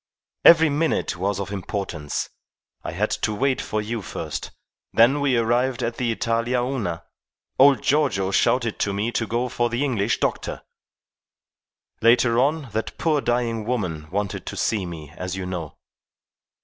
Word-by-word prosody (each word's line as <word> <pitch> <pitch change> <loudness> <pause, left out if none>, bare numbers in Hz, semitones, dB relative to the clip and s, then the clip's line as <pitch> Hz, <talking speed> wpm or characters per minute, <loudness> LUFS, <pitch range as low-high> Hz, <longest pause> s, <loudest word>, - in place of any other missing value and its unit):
Every 160 -2 +7
minute 155 - 0
was 95 +2 -1
of 100 0 -4
importance. 95 -6 -4 0.5
I - - -5
had - - -1
to 105 - 0
wait 135 +3 +1
for 110 0 -2
you 115 +1 -3
first. - - -5 0.4
Then, 120 +5 +5
when - - -3
we 135 -3 +2
arrived 120 +2 +1
at 115 0 -2
the 120 -2 0
Italia 115 +2 0
Una, 115 -10 -2 0.6
old 135 0 +6
Giorgio 130 -10 +2
shouted 115 +2 +1
to 100 - 0
me 105 +4 -1
to 115 -1 -1
go 120 +2 0
for 120 0 0
the 120 +4 -1
English 115 -8 0
doctor. - - -2 1.4
Later 120 +1 +4
on, 145 0 +1
that 110 +2 -3
poor 155 -3 +1
dying 120 -3 0
woman 90 -10 -3
wanted 100 +2 -3
to - - -5
see 100 -5 0
me, 80 -4 -8
as 90 0 -4
you 95 -1 -4
know. 90 -5 -5
115 Hz, 160 wpm, -23 LUFS, 100-125 Hz, 1.4 s, Every